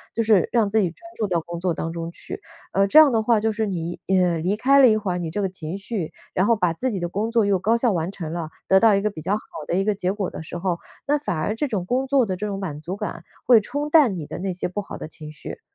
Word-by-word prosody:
就 230 - +1
是 215 -6 +3
让 225 -4 +2
自 220 +2 +2
己 180 - +1
专 165 - -16 0.2
注 215 - 0
到 175 -3 +1
工 170 +1 -7
作 180 -1 0
当 165 +1 -3
中 165 0 -4
去， 390 - -8 0.3
呃， 195 0 +3
这 305 - +4
样 305 -4 +9
的 225 -1 +2
话 225 0 +3
就 220 +1 +1
是 220 0 -1
你， 175 -2 -4
呃， 180 -3 +3
离 185 +6 0
开 275 +5 +4
了 260 - +8
一 215 - +4
会 200 -4 -2
儿 180 - -1
你 165 -2 -3
这 190 - -3
个 190 - 0
情 175 -1 -6
绪， 195 -4 -4 0.2
然 185 +3 +2
后 230 - +4
把 180 -5 +1
自 260 +10 -2
己 200 -6 -2
的 175 0 -3
工 210 +5 -2
作 230 -3 +2
又 195 -2 +2
高 220 +5 +2
效 235 -1 +2
完 170 0 -1
成 165 -5 -6
了， 165 -2 -4 0.2
得 190 0 +6
到 220 -2 +5
一 200 - +1
个 210 - +1
比 160 - -8
较 190 +6 -1
好 210 - +1 0.3
的 - - 0
一 195 - +2
个 210 0 +1
结 185 -1 -1
果 200 -3 -3
的 - - -7
时 170 +2 -7
候， 175 -1 -1 0.3
那 290 +1 +2
反 180 - -2
而 205 +7 -1
这 290 +5 -1
种 195 -7 -2
工 260 +5 0
作 270 -2 +3
的 190 -3 -2
这 210 +2 -3
种 195 -1 -4
满 155 -7 -5
足 180 +5 -4
感 170 -5 -5 0.2
会 240 -3 +7
冲 285 +7 -3
淡 280 - +5
你 165 -4 -5
的 - - -7
那 190 +1 -2
些 180 - -2
不 205 +3 -3
好 - - -8
的 - - -7
情 155 -1 -10
绪。 150 - -9
195 Hz, 330 characters per minute, -23 LUFS, 175-225 Hz, 0.3 s, 样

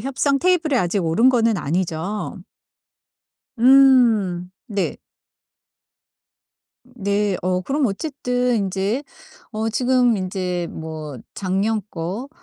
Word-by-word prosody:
협상 275 +3 0
테이블에 330 -4 +2
아직 180 -3 0
오른 165 +10 +3
거는 230 -4 +3
아니죠? 175 +4 -3 1.2
음. 235 -9 +5 0.2
네. 205 -6 -2 1.9
네. 205 -5 -1
어 180 +1 0
그럼 280 +6 0
어쨌든 250 +1 -1
인제 195 +5 -1 0.5
어 220 0 -2
지금 245 0 +2
인제 180 -2 -3
뭐 155 -4 -7 0.2
작년 200 +3 -1
거 185 +10 -5
210 Hz, 170 characters per minute, -21 LUFS, 185-250 Hz, 1.9 s, 음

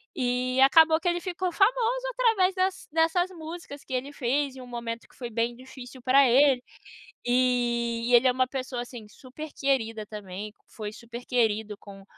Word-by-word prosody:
E 255 +1 0
acabou 320 +3 +6
que 345 - -4
ele 345 - 0
ficou 365 -1 -3
famoso - - +2
através 450 -7 +2
dess 375 +1 -1
dessas 330 +3 +2
músicas 320 -3 -9
que 260 - -8
ele 270 +3 -3
fez 270 +1 -1
em 260 - -9
um 250 - -11
momento 235 -1 -6
que - - -23
foi 240 -2 -6
bem 235 +1 -1
difícil 255 0 -12
pra 265 +2 +5
ele, 265 0 +5 0.7
e 240 -2 +1
e 245 - +4
ele 250 +2 +6
é - - +3
uma 255 +1 +1
pessoa 255 -2 -4
assim, 240 -3 -10
super 275 +7 -10
querida 225 -6 -1
também, 205 0 -7 0.2
foi 210 -1 -7
super 235 +2 -10
querido 220 -4 0
com 195 -1 -13
255 Hz, 175 wpm, -27 LUFS, 235-315 Hz, 0.7 s, acabou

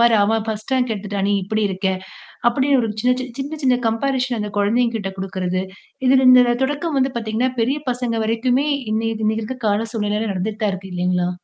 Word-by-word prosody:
"பாரு! 235 -1 +5
அவ 225 +2 +2
first 215 +4 -4
rank 250 -3 +1
எடுத்துட்டா. 205 0 -4
நீ - - +2
இப்படி 215 +3 -1
இருக்க." 190 +1 -3 0.6
அப்படின்னு 270 +2 +2
ஒரு 225 - -1
சின்ன 250 +1 +3
சின்ன, 255 -1 -5
சின்ன 295 +3 -5
சின்ன 255 -2 +4
கம்பேரிசன் 250 +1 0
அந்த 210 -1 -3
குழந்தைங்ககிட்ட 220 -1 +1
குடுக்கிறது. 185 -1 -2 0.5
இதுல 260 0 +5
இந்த 245 -1 +6
தொடக்கம் 290 +2 -1
வந்து 265 +1 +1
பாத்தீங்கன்னா, 230 +3 -1
பெரிய 265 +6 +1
பசங்க 245 -1 -2
வரைக்குமே 245 +5 +1 0.3
இன்னைய 225 0 -1
இன்னைக்கு 220 +1 0
இருக்க 255 +4 -5
கால 210 +2 +1
சூழ்நிலையில 210 0 -1
நடந்துட்டுதான் 210 +2 -1
இருக்கு 190 0 -8
இல்லைங்களா? 180 0 0
225 Hz, 180 wpm, -20 LUFS, 205-255 Hz, 0.6 s, இந்த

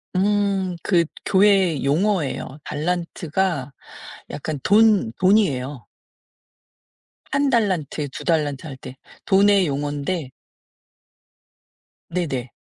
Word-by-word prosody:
음. 195 -2 +1
그 170 -4 +3 0.2
교회의 190 -6 +3
용어예요. 150 -3 0
달란트가 170 -2 -2 0.6
약간 145 0 -5
돈, 210 - +4
돈이에요. 145 - +1 1.5
1 280 0 +2
달란트 180 - 0
2 - - -8
달란트 155 -3 0
할 135 -3 -8
때. 130 0 -10 0.3
돈의 200 -1 +4
용언데 145 +2 -3 1.8
네네. 140 -9 -3
170 Hz, 165 characters per minute, -22 LUFS, 145-195 Hz, 1.8 s, 돈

